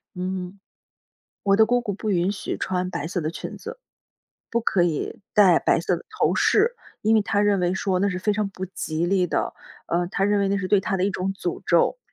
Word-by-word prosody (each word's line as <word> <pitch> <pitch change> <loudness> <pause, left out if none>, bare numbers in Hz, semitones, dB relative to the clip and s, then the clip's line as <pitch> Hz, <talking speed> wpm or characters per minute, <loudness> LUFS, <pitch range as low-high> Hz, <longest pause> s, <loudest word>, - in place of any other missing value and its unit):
嗯， 185 +1 -4 0.8
我 195 -1 +3
的 220 0 +6
姑 245 +1 +2
姑 210 -4 -3
不 210 +2 -3
允 180 +1 +2
许， 200 - -4
穿 185 -1 -2
白 170 -4 -4
色 175 - -2
的 155 0 -2
裙 - - -7
子， - - -8 0.7
不 235 - +1
可 195 -5 +2
以 175 +7 -2
戴 195 -5 +6
白 - - +2
色 175 +1 0
的 - - -11
头 430 - +1
饰， 460 +4 +3 0.3
因 220 +1 +3
为 215 - +3
他 205 0 0
认 205 -1 +3
为 180 +1 +1
说 190 -1 0
那 200 - +2
是 180 -2 -2
非 210 +2 +1
常 205 -1 -1
不 190 -1 -6
吉 170 -2 -3
利 185 -1 +2
的。 - - -1 0.3
呃， 175 +1 +1
他 195 +1 0
认 205 0 +2
为 195 - +1
那 200 - +1
是 185 -2 -3
对 205 -2 +4
他 195 0 -1
的 185 - +1
一 200 - +1
种 190 0 -2
诅 180 -3 -4
咒。 170 - +3
195 Hz, 245 characters per minute, -24 LUFS, 180-205 Hz, 0.8 s, 的